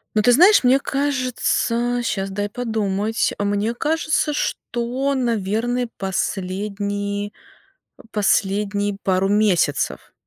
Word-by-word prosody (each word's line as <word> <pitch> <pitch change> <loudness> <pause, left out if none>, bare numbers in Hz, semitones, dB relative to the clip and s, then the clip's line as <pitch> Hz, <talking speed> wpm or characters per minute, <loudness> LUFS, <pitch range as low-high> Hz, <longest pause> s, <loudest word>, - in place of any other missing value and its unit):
Ну, 215 - +4
ты 245 - +4
знаешь, 360 - +6
мне 260 +2 +5
кажется, 255 -3 0
щас 195 -3 -2
дай 205 +1 -2
подумать, 220 -2 -1
мне 205 +3 0
кажется, 310 +2 0
что, 260 0 -2
наверно, 235 +1 -1
последние 200 +2 -3 0.8
последние 205 0 0
пару 190 0 +1
месяцев. 200 -8 +1
215 Hz, 95 wpm, -21 LUFS, 200-245 Hz, 0.8 s, знаешь